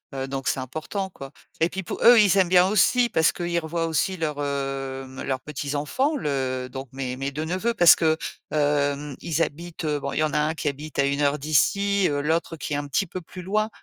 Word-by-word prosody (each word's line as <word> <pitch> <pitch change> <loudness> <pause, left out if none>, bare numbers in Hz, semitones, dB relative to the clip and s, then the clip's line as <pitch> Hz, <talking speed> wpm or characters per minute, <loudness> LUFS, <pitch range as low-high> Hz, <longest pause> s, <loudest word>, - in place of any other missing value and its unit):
heu, 135 0 -2
donc 135 -1 -4
c'est 130 - 0
important, 155 - -4
quoi 135 -6 -10 0.3
et 165 - +3
puis 190 -1 -5
pou - - -5
eux, 240 -1 +8
ils 200 -2 +5
aiment 185 -2 +4
bien 180 0 +6
aussi 235 +4 +3
parce 160 -6 +3
qu'ils 170 -1 -1
revoient 165 +1 -2
aussi 175 +4 0
leurs, 150 -3 -2
hem, 135 -1 -4
leurs 130 -1 -2
petits-enfants, 150 - -2
le 130 - -2
donc 135 +1 -6
mes 130 -1 -4
mes 135 +1 -3
2 150 +3 -4
neveux, 185 +8 -1
parce 175 -6 +7
que, 160 -1 +2 0.3
hem, 145 -1 0
ils 165 -1 0
habitent, 170 +3 -6
heu, 150 -2 0
bon, 140 0 -4
il - - -2
y - - +3
en 150 -1 -1
a 150 - +2
un 155 +1 +1
qui 150 - -1
habite 145 +2 -8
à 140 - +4
1 140 +1 0
heure 145 +1 +2
d'ici, 200 +7 +2
heu, 145 0 -1
l'autre, 165 +2 -1
qui 150 - -7
est - - 0
un 145 0 -4
petit 195 +8 0
peu 185 - -6
plus 180 +2 -10
loin, 215 +4 0
150 Hz, 235 wpm, -24 LUFS, 140-175 Hz, 0.3 s, eux